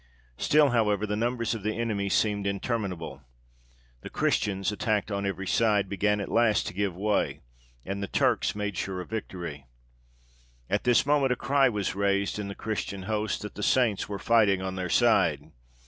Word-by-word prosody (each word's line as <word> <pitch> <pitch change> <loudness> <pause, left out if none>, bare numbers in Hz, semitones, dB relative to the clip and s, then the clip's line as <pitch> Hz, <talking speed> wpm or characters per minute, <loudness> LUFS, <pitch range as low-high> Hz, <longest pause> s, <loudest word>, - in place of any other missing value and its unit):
Still, 150 -1 +4
however, 105 -3 +2
the 105 0 -2
numbers 115 +1 -1
of 115 - -5
the 110 +2 -2
enemy 105 -4 -1
seemed 100 -1 +1
interminable. 100 - -3 0.8
The - - -8
Christians, 100 -1 0
attacked 105 0 -1
on 100 0 -1
every 95 0 -3
side, 105 -1 +2
began 105 +1 +1
at 100 - -5
last 115 -2 +3
to - - -5
give 100 -1 -1
way, 105 +3 0 0.4
and 100 +1 -4
the 100 - -2
Turks - - +1
made 105 -1 -3
sure 95 0 -3
of 90 - -8
victory. 85 - -6 1.0
At - - 0
this 125 0 +4
moment 140 -3 +3
a - - -3
cry 135 +1 +3
was 105 -5 -2
raised 100 +1 0
in 105 - -4
the 100 - -6
Christian 105 -3 -4
host 105 +1 -2
that 105 - -6
the - - -7
saints 110 -3 +2
were 100 - -3
fighting 105 -3 +3
on 95 0 -4
their 90 -1 -4
side. 80 - +2
105 Hz, 180 wpm, -27 LUFS, 95-110 Hz, 1.0 s, Still